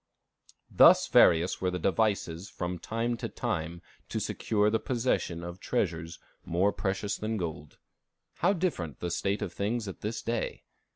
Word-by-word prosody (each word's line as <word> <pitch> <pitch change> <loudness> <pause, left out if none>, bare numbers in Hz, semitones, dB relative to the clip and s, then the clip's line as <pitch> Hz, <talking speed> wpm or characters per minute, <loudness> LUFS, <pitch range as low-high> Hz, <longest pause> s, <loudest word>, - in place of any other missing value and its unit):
Thus - - +7
various 85 +1 +5
were 90 - +1
the 90 - -2
devices 95 -2 0
from 90 0 -4
time 115 +6 -2
to - - -4
time 85 +2 -3 0.3
to - - -2
secure 105 -1 +1
the 110 - +2
possession 115 -9 -1
of 85 +1 -7
treasures 85 -8 -2 0.3
more 95 +4 +1
precious 100 +1 -2
than 110 +1 -2
gold. 80 -5 -5 0.6
How 190 +3 +3
different 155 - -2
the 90 - -3
state 100 +4 -1
of 85 - -5
things 110 +2 -2
at 95 - -7
this 110 +1 -3
day! 115 0 -2
95 Hz, 155 wpm, -29 LUFS, 85-110 Hz, 0.6 s, Thus